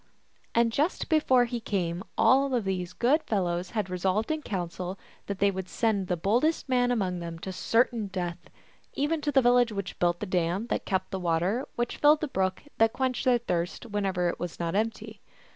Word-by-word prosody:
And 230 Hz, 0 st, +4 dB
just 295 Hz, +9 st, 0 dB
before 260 Hz, -6 st, +4 dB
he 240 Hz, 0 st, -3 dB
came 185 Hz, -5 st, -2 dB
all 270 Hz, 0 st, +4 dB
of 235 Hz, -, 0 dB
these 185 Hz, -2 st, -2 dB
good 260 Hz, -, +2 dB
fellows 180 Hz, -, -1 dB
had 210 Hz, -3 st, 0 dB
resolved 190 Hz, -, 0 dB
in 315 Hz, 0 st, -1 dB
council 180 Hz, -, -4 dB, 0.3 s
that 200 Hz, -, -3 dB
they 200 Hz, +1 st, +3 dB
would 190 Hz, -1 st, -5 dB
send 210 Hz, -5 st, 0 dB
the 180 Hz, -, 0 dB
bold 205 Hz, -, +1 dB
est 315 Hz, -1 st, +1 dB
man 250 Hz, -1 st, +2 dB
among 190 Hz, -7 st, 0 dB
them 170 Hz, -1 st, -6 dB
to 190 Hz, +3 st, -6 dB
certain 230 Hz, +2 st, +1 dB
death, 175 Hz, -3 st, -5 dB, 0.5 s
even 300 Hz, +3 st, 0 dB
to 295 Hz, -, 0 dB
the 270 Hz, -2 st, +4 dB
vil 245 Hz, 0 st, +5 dB
lage 245 Hz, -2 st, +4 dB
which 200 Hz, -2 st, -5 dB
built 175 Hz, 0 st, +2 dB
the -, -, -3 dB
dam 180 Hz, +2 st, 0 dB
that -, -, -1 dB
kept 190 Hz, 0 st, -1 dB
the 190 Hz, -, -2 dB
water 180 Hz, +8 st, 0 dB
which 240 Hz, 0 st, -2 dB
filled 295 Hz, +1 st, +5 dB
the 310 Hz, -, -1 dB
brook 190 Hz, -7 st, -1 dB, 0.2 s
that 225 Hz, 0 st, +4 dB
quenched 260 Hz, -2 st, -1 dB
their 250 Hz, -1 st, +5 dB
thirst, 175 Hz, -4 st, -3 dB
whenever 195 Hz, -5 st, -1 dB
it 170 Hz, -, -2 dB
was 175 Hz, -2 st, -5 dB
not 170 Hz, -1 st, -2 dB
empty. 220 Hz, +3 st, -2 dB
200 Hz, 205 wpm, -28 LUFS, 180-245 Hz, 0.5 s, vil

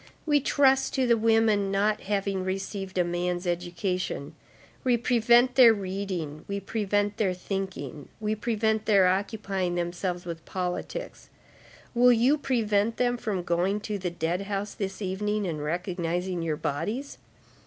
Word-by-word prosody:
We 295 Hz, -2 st, +4 dB
trust 270 Hz, -1 st, +3 dB
to 265 Hz, -, +2 dB
the 235 Hz, -1 st, +4 dB
women 220 Hz, -3 st, +3 dB
not 210 Hz, +2 st, +1 dB
having 195 Hz, -1 st, -1 dB
received 190 Hz, 0 st, -4 dB
a 180 Hz, -, +4 dB
man's 175 Hz, +1 st, -2 dB
education, 175 Hz, -3 st, -2 dB, 0.5 s
we 250 Hz, -2 st, +3 dB
prevent 240 Hz, +1 st, +4 dB
their 240 Hz, -4 st, +7 dB
reading, 185 Hz, -6 st, -4 dB
we 200 Hz, 0 st, -2 dB
prevent 205 Hz, 0 st, -1 dB
their 190 Hz, -4 st, +1 dB
thinking, 180 Hz, -7 st, -5 dB
we 215 Hz, -1 st, -1 dB
prevent 220 Hz, 0 st, 0 dB
their 200 Hz, -3 st, +5 dB
occupying 195 Hz, -1 st, 0 dB
themselves 175 Hz, +1 st, -2 dB
with 165 Hz, -2 st, -6 dB
politics; 180 Hz, -1 st, -5 dB, 0.6 s
will 245 Hz, +1 st, +6 dB
you 250 Hz, +6 st, +3 dB
prevent 225 Hz, -5 st, +1 dB
them 245 Hz, -1 st, +2 dB
from 210 Hz, -6 st, -3 dB
going 175 Hz, +4 st, +1 dB
to 210 Hz, -1 st, -3 dB
the 180 Hz, -1 st, -2 dB
dead 170 Hz, +2 st, -2 dB
house 200 Hz, 0 st, -2 dB
this 195 Hz, 0 st, -4 dB
evening, 205 Hz, +2 st, -1 dB
and 155 Hz, -4 st, -3 dB
recognizing 175 Hz, +2 st, -2 dB
your 160 Hz, -2 st, -1 dB
bodies? 190 Hz, -, -3 dB
195 Hz, 145 wpm, -27 LUFS, 180-220 Hz, 0.6 s, their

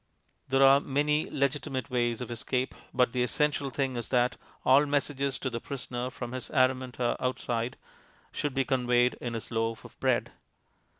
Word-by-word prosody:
There 135 Hz, +1 st, +4 dB
are 135 Hz, +1 st, +7 dB
many 150 Hz, +2 st, 0 dB
legitimate 140 Hz, -1 st, -1 dB
ways 120 Hz, -1 st, 0 dB
of 120 Hz, -1 st, -5 dB
escape, 125 Hz, +2 st, -1 dB, 0.2 s
but 125 Hz, -2 st, +3 dB
the 125 Hz, -, +1 dB
essential 140 Hz, +4 st, +1 dB
thing 135 Hz, -1 st, -1 dB
is 120 Hz, -3 st, -4 dB
that 125 Hz, -1 st, +2 dB, 0.3 s
all 140 Hz, +3 st, +6 dB
messages 140 Hz, -1 st, 0 dB
to 130 Hz, -, -2 dB
the 115 Hz, -1 st, -4 dB
prisoner 125 Hz, -2 st, -4 dB
from 120 Hz, -2 st, -6 dB
his 130 Hz, 0 st, -4 dB
Araminta 130 Hz, -1 st, +1 dB
outside 125 Hz, -1 st, -1 dB, 0.5 s
should 145 Hz, -3 st, -2 dB
be 135 Hz, -1 st, +2 dB
conveyed 125 Hz, -1 st, +3 dB
in 120 Hz, -1 st, -3 dB
his 115 Hz, -, -6 dB
loaf 115 Hz, 0 st, -1 dB
of -, -, -14 dB
bread. -, -, +1 dB
130 Hz, 165 wpm, -29 LUFS, 120-135 Hz, 0.5 s, are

